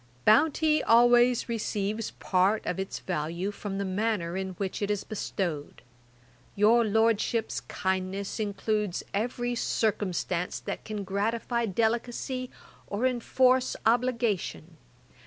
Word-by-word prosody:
'Bounty 310 Hz, +6 st, +4 dB
always 240 Hz, +1 st, +5 dB
receives 215 Hz, -2 st, -2 dB
part 190 Hz, +3 st, +1 dB
of 180 Hz, -, -2 dB
its 190 Hz, 0 st, -3 dB
value 175 Hz, +3 st, -3 dB
from 200 Hz, -1 st, -5 dB
the 200 Hz, -, -1 dB
manner 190 Hz, -3 st, -1 dB
in 190 Hz, 0 st, -3 dB
which 190 Hz, +2 st, -4 dB
it 205 Hz, -, -1 dB
is 205 Hz, -2 st, -1 dB
bestowed; 175 Hz, -7 st, -4 dB, 0.7 s
your 225 Hz, +4 st, +5 dB
Lordship's 225 Hz, +1 st, +1 dB
kindness 190 Hz, +2 st, -3 dB
includes 210 Hz, -2 st, -1 dB
every 240 Hz, +3 st, -1 dB
circumstance 185 Hz, -6 st, -1 dB
that -, -, -5 dB
can 210 Hz, -2 st, -4 dB
gratify 225 Hz, +4 st, -1 dB
delicacy, 235 Hz, +4 st, -1 dB, 0.4 s
or 210 Hz, +5 st, -1 dB
enforce 255 Hz, +1 st, +2 dB
obligation. 230 Hz, -, 0 dB
215 Hz, 110 wpm, -28 LUFS, 190-235 Hz, 0.7 s, always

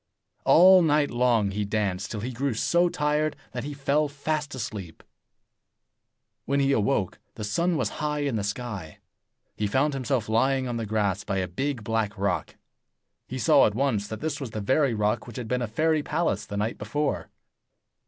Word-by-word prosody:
All 185 Hz, +2 st, +8 dB
night 150 Hz, -3 st, +2 dB
long 120 Hz, -4 st, +2 dB
he 105 Hz, +2 st, -2 dB
danced, 100 Hz, -2 st, -1 dB
till 105 Hz, -, -4 dB
he 125 Hz, +4 st, -3 dB
grew 130 Hz, 0 st, -1 dB
so 175 Hz, +9 st, +2 dB
tired 150 Hz, 0 st, 0 dB, 0.2 s
that -, -, -4 dB
he 145 Hz, +1 st, -5 dB
fell 145 Hz, +2 st, +1 dB
fast 145 Hz, 0 st, -3 dB
asleep. 105 Hz, -9 st, -6 dB, 1.4 s
When 140 Hz, +1 st, +1 dB
he 140 Hz, 0 st, +3 dB
awoke, 105 Hz, -5 st, 0 dB, 0.2 s
the 110 Hz, -, -6 dB
sun 165 Hz, +12 st, 0 dB
was -, -, 0 dB
high 150 Hz, -1 st, -1 dB
in 140 Hz, -4 st, -1 dB
the 105 Hz, -, -1 dB
sky. 105 Hz, -6 st, -5 dB, 0.6 s
He 105 Hz, -, 0 dB
found 135 Hz, +7 st, +1 dB
himself 130 Hz, -4 st, -1 dB
lying 130 Hz, +4 st, +2 dB
on 120 Hz, -1 st, -2 dB
the 115 Hz, -2 st, -3 dB
grass 105 Hz, -2 st, 0 dB
by 100 Hz, -2 st, -2 dB
a 95 Hz, -1 st, -1 dB
big 130 Hz, +6 st, -3 dB
black 110 Hz, -1 st, -1 dB
rock. 100 Hz, +1 st, -1 dB, 0.7 s
He 130 Hz, -, -5 dB
saw 120 Hz, -, +5 dB
at 105 Hz, -, -3 dB
once 115 Hz, -6 st, 0 dB
that 110 Hz, 0 st, -6 dB
this 150 Hz, -2 st, -3 dB
was 130 Hz, -, -4 dB
the 110 Hz, -, -5 dB
very 130 Hz, +4 st, +2 dB
rock 105 Hz, +2 st, 0 dB
which 120 Hz, -, -9 dB
had 120 Hz, -3 st, -5 dB
been 125 Hz, +2 st, 0 dB
a 120 Hz, -, -1 dB
fairy 155 Hz, +7 st, +1 dB
palace 150 Hz, -, -1 dB
the 100 Hz, -, -5 dB
night 105 Hz, +3 st, -2 dB
before. 150 Hz, -1 st, -2 dB
125 Hz, 185 wpm, -26 LUFS, 105-145 Hz, 1.4 s, All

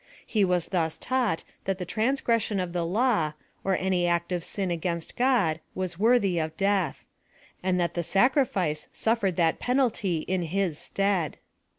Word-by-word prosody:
He 215 Hz, -3 st, +1 dB
was 180 Hz, -2 st, +1 dB
thus 160 Hz, -4 st, 0 dB
taught 250 Hz, -9 st, 0 dB, 0.2 s
that 195 Hz, -1 st, 0 dB
the 180 Hz, -, -4 dB
transgression 230 Hz, 0 st, +1 dB
of 180 Hz, -2 st, -3 dB
the 175 Hz, -1 st, 0 dB
law, 185 Hz, -4 st, +1 dB, 0.3 s
or 190 Hz, -1 st, +1 dB
any 185 Hz, -2 st, +1 dB
act 170 Hz, +1 st, 0 dB
of 175 Hz, -2 st, -1 dB
sin 190 Hz, -1 st, -2 dB
against 170 Hz, 0 st, -3 dB
God, 240 Hz, -11 st, +2 dB, 0.2 s
was 185 Hz, -2 st, -3 dB
worthy 210 Hz, -6 st, +3 dB
of 160 Hz, 0 st, -3 dB
death; 195 Hz, -3 st, 0 dB, 0.6 s
and 180 Hz, -1 st, +1 dB
that 170 Hz, -1 st, 0 dB
the 175 Hz, -, -1 dB
sacrifice 195 Hz, -, +1 dB
suffered 220 Hz, -5 st, 0 dB
that 165 Hz, -2 st, +2 dB
penalty 230 Hz, -, +1 dB
in 185 Hz, +2 st, -1 dB
his 175 Hz, -1 st, -1 dB
stead. 195 Hz, -6 st, 0 dB
185 Hz, 160 wpm, -27 LUFS, 170-215 Hz, 0.6 s, worthy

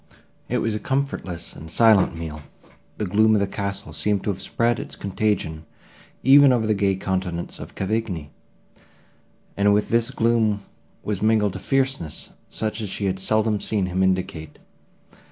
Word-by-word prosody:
It -, -, +1 dB
was 115 Hz, -, 0 dB
a 105 Hz, -, -2 dB
comfortless 130 Hz, -, -3 dB
and 80 Hz, +3 st, -10 dB
silent 105 Hz, -3 st, +4 dB
meal. 80 Hz, -2 st, -6 dB, 0.6 s
The 105 Hz, -, -1 dB
gloom 110 Hz, +3 st, +4 dB
of -, -, +3 dB
the 100 Hz, -, +2 dB
castle 100 Hz, +1 st, -4 dB
seemed 105 Hz, -2 st, 0 dB
to 105 Hz, -, 0 dB
have 95 Hz, -1 st, -7 dB
spread 115 Hz, +3 st, 0 dB
its -, -, -7 dB
contagion 100 Hz, -6 st, -1 dB, 0.6 s
even 140 Hz, +1 st, +8 dB
over 120 Hz, -3 st, +2 dB
the 110 Hz, -, +2 dB
gay 100 Hz, -1 st, +1 dB
countenance 95 Hz, -2 st, -3 dB
of -, -, -9 dB
Cavigni, 95 Hz, -7 st, -2 dB, 1.2 s
and 100 Hz, 0 st, +4 dB
with 105 Hz, -, 0 dB
this 115 Hz, 0 st, +2 dB
gloom 110 Hz, -3 st, +1 dB, 0.4 s
was 105 Hz, -3 st, -2 dB
mingled 105 Hz, -3 st, +2 dB
a -, -, -4 dB
fierceness 135 Hz, -, -1 dB, 0.2 s
such 110 Hz, 0 st, -2 dB
as 105 Hz, -, -4 dB
she 100 Hz, -, -3 dB
had 95 Hz, -1 st, -1 dB
seldom 110 Hz, +2 st, +1 dB
seen 100 Hz, -2 st, 0 dB
him 90 Hz, +1 st, -1 dB
indicate. 95 Hz, -4 st, -1 dB
100 Hz, 160 wpm, -23 LUFS, 95-110 Hz, 1.2 s, even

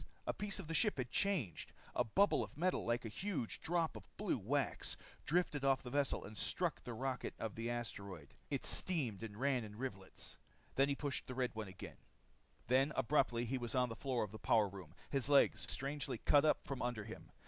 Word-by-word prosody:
A -, -, 0 dB
piece 205 Hz, -1 st, -3 dB
of 195 Hz, -, -5 dB
the 165 Hz, -, -4 dB
ship 205 Hz, +4 st, +3 dB
had 125 Hz, -2 st, -3 dB
changed. 180 Hz, -, 0 dB, 0.2 s
A -, -, +2 dB
bubble 195 Hz, -, +3 dB
of -, -, -9 dB
metal, 180 Hz, +3 st, +1 dB
like 120 Hz, +1 st, +1 dB
a -, -, -1 dB
huge 150 Hz, -, -3 dB
drop 165 Hz, -1 st, +1 dB
of -, -, -10 dB
blue 205 Hz, -, 0 dB
wax, 135 Hz, +7 st, -1 dB, 0.3 s
dripped 175 Hz, +3 st, +2 dB
off 135 Hz, -1 st, +3 dB
the 125 Hz, -, -6 dB
vessel 140 Hz, 0 st, +1 dB
and 110 Hz, -, -9 dB
struck 175 Hz, +7 st, 0 dB
the 120 Hz, -1 st, -5 dB
rocket 130 Hz, +1 st, -2 dB
of 110 Hz, -3 st, -3 dB
the 115 Hz, +1 st, -3 dB
asteroid. 100 Hz, -, -5 dB, 0.2 s
It -, -, -1 dB
steamed 135 Hz, -, +3 dB
and 110 Hz, -2 st, -6 dB
ran 130 Hz, -1 st, +1 dB
in 105 Hz, -1 st, -8 dB
rivulets. 100 Hz, -7 st, -6 dB, 0.4 s
He 140 Hz, +1 st, +3 dB
pressed 140 Hz, -1 st, -3 dB
the 125 Hz, -, -5 dB
red 125 Hz, -1 st, 0 dB
button 110 Hz, -3 st, -5 dB
again. 95 Hz, -, -9 dB, 0.7 s
Then 135 Hz, +4 st, +3 dB
abruptly 130 Hz, -3 st, +2 dB
he 130 Hz, +3 st, -1 dB
was 120 Hz, 0 st, -3 dB
on 125 Hz, -1 st, +3 dB
the 115 Hz, -, -5 dB
floor 130 Hz, -2 st, 0 dB
of 105 Hz, -, -5 dB
the 110 Hz, -, -8 dB
power 110 Hz, -3 st, +4 dB
room, 95 Hz, -4 st, -10 dB, 0.2 s
his 140 Hz, -1 st, +2 dB
legs 140 Hz, -1 st, +5 dB
strangely 140 Hz, -2 st, -2 dB
cut 145 Hz, +6 st, +5 dB
out 155 Hz, -, +3 dB
from 135 Hz, -2 st, -4 dB
under 120 Hz, -3 st, -1 dB
him. 110 Hz, +2 st, -9 dB
130 Hz, 205 wpm, -38 LUFS, 115-145 Hz, 0.7 s, legs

